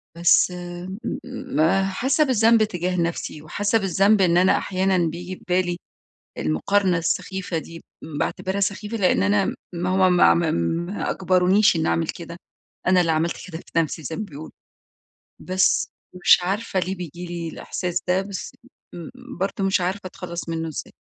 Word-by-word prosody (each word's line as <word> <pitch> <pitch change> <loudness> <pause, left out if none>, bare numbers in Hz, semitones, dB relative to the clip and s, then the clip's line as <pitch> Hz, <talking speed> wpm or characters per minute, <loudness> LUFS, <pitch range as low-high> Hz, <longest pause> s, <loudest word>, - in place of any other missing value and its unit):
بس 170 +1 +4
إمم، 180 +2 -7 0.3
مم 250 - -5 0.3
حاسة 265 +10 +2
بالذنب 230 -4 +4
تجاه 180 -3 -2
نفسي، 170 -2 -3
وحاسة 205 +8 0
بالذنب 195 +1 +3
إن 175 -1 +4
أنا 185 +1 +4
أحيانًا 190 0 0
بييجي 175 +3 -6
ببالي 180 -1 -1 0.6
المقارنة 180 - +1
السخيفة 180 +1 -2
دي، 165 +1 -10 0.2
باعتبرها 185 +5 -3
سخيفة 210 +3 -2
لأن 190 -2 +2
أنا 200 -1 +2 0.2
ما 175 +1 -2
هو 185 0 +4
ما 180 - +6
ما 170 -2 +1
ما 170 - -1
أجبرونيش 185 +1 +3
إن 160 - 0
أعمل 165 -1 +1
كده، 170 0 -6 0.5
أنا 185 0 +5
اللي 165 -2 +2
عملت 160 +2 0
كده 160 -2 -6
في 165 - -4
نفسي 160 0 -1
زي 160 +3 -5
ما 215 - -3
بيقولوا، 155 -4 -10 0.9
بس 185 0 +1 0.3
مش - - +7
عارفة 195 +1 -1
ليه 190 +2 -2
بييجي 175 0 -7
لي 170 -1 -5
الإحساس 180 +1 -3
ده؟ 185 +1 +2
بس 200 +5 -7 0.4
مم 170 -2 -8 0.3
برضو 195 0 -2
مش 195 -1 +2
عارفة 185 +3 -1
أتخلص 170 -1 -7
منه 165 0 -2
إزاي؟ 155 - -6
180 Hz, 155 wpm, -23 LUFS, 170-195 Hz, 0.9 s, مش